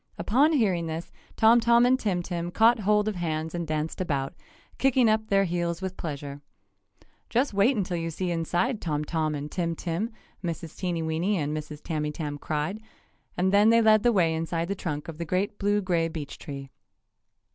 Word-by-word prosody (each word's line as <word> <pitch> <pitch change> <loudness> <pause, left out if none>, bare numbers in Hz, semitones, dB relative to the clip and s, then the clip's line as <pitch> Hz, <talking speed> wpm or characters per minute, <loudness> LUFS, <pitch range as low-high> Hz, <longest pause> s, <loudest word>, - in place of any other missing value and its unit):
Upon 280 +9 +3
hearing 190 - +1
this 160 +1 -5 0.2
Tom 225 +2 +6
Tom 235 +1 +5
and 260 +1 +3
Tim 185 -7 -1
Tim 175 -1 -3
caught 230 +5 +4
hold 210 +1 +2
of 210 -3 -2
hands 160 -2 -2
and 170 -2 -3
danced 155 +3 -2
about, 140 -6 -1 0.5
kicking 260 -2 +4
up 220 0 +2
their 195 -2 +3
heels 170 -2 -1
with 190 -1 -4
pleasure. 145 -2 -6 0.9
"Just 245 +1 +1
wait 210 +6 +3
until 180 -3 -1
you 165 0 -2
see 175 +2 -3
inside, 175 +8 0
Tom 150 -2 -2
Tom 155 -1 -1
and 145 +1 -5
Tim 170 -2 -1
Tim!" 175 +7 -2 0.3
Mrs. 165 -2 -5
Teenyweeny 170 +2 -1
and 150 -1 -1
Mrs. 150 -1 -7
Tamytam 150 -2 -3
cried, 155 +10 -2 0.6
and 190 +2 +1
then 205 +2 +6
they 230 0 +6
led 215 -1 +5
the 240 - +4
way 175 -7 +3
inside 165 +1 -2
the - - +1
trunk 150 -6 -4
of 165 -1 -8
the - - -1
great 185 +5 -1
blue 205 +1 +2
gray 170 -3 +1
beech 160 -3 -7
tree. 140 -3 -8
175 Hz, 185 wpm, -27 LUFS, 160-210 Hz, 0.9 s, Tom